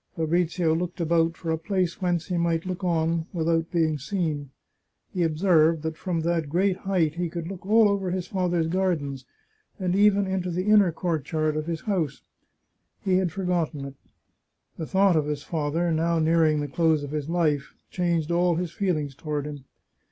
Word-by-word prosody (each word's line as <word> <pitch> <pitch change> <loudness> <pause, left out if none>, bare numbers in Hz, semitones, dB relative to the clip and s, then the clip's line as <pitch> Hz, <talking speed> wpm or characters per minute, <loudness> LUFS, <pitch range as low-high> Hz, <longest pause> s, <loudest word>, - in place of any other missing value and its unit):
Fabrizio 165 0 +1
looked 175 +2 -3
about 165 0 +1
for 165 - -3
a 160 - -1
place 185 +1 -1
whence 175 -3 0
he 180 - -3
might 170 0 0
look 185 +1 -4
on 165 -1 0
without 165 -1 0
being 160 -3 +1
seen. 150 -3 -2 0.6
He 180 - -1
observed 165 -1 +3
that 160 0 -3
from 170 0 -2
that 165 -2 -1
great 185 +4 +2
height 180 -6 0
he 175 +1 -2
could 165 0 -5
look 190 -1 -7
all 220 +1 +6
over 200 -2 0
his 180 0 -2
father's 180 -3 0
gardens, 160 -7 -1 0.5
and 185 -1 0
even 200 0 +4
into 190 -1 -2
the 180 +2 -2
inner 210 -4 +5
courtyard 155 -2 -1
of 155 +1 -3
his 165 -2 -3
house. 180 -9 -2 0.8
He 185 -2 +2
had 185 -3 0
for 190 +4 -5
gotten 165 -6 -1
it. 140 0 -8 0.8
The 160 - -5
thought 190 -2 +3
of 150 -2 +1
his 150 -1 -3
father, 165 +2 -1
now 165 +1 +1
nearing 160 -1 +3
the 145 - -2
close 160 +1 +1
of 145 - -6
his 150 0 -3
life, 155 -5 0 0.2
changed 170 -3 0
all 175 0 +2
his 175 -1 -2
feelings 160 -9 -1
toward 145 +1 -4
him. 145 -3 -7
170 Hz, 180 wpm, -25 LUFS, 155-180 Hz, 0.8 s, all